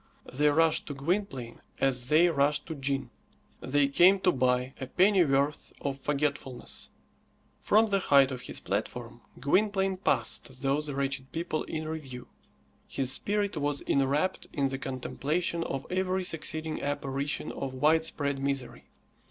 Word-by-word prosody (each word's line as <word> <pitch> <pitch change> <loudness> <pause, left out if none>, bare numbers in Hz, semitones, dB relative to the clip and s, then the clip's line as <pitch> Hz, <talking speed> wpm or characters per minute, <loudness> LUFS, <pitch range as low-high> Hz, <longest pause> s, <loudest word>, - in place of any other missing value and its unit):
They 150 +3 +3
rushed 160 +1 +3
to 145 - -5
Gwynplaine 135 - -2 0.2
as 125 -2 +1
they 160 +3 +6
rushed 145 -1 +1
to 165 - -5
gin. 135 -3 -2 0.5
They 140 +2 +2
came 180 +7 +5
to 180 - +4
buy 125 -1 +1
a 130 - -3
pennyworth 150 -6 +2
of 140 -1 -3
forgetfulness. 140 -3 -3 0.7
From 215 +2 +4
the 200 -2 +1
height 140 -6 +5
of 125 -1 -5
his - - -6
platform 120 +4 -4 0.2
Gwynplaine 195 - +2
passed 135 -7 -1
those 145 +2 0
wretched 135 -1 -2
people 165 -1 -2
in 155 0 -4
review. 135 -6 -7 0.6
His 130 -1 -1
spirit 205 +7 -1
was 145 -1 -1
enwrapt 140 +7 +1
in 140 -3 0
the 135 0 -4
contemplation 150 +6 -2
of 135 0 -4
every 185 0 0
succeeding 160 -2 -3
apparition 140 0 -2
of 130 -1 -5
widespread 150 -1 +1
misery. 135 -1 -3
145 Hz, 135 wpm, -29 LUFS, 135-165 Hz, 0.7 s, they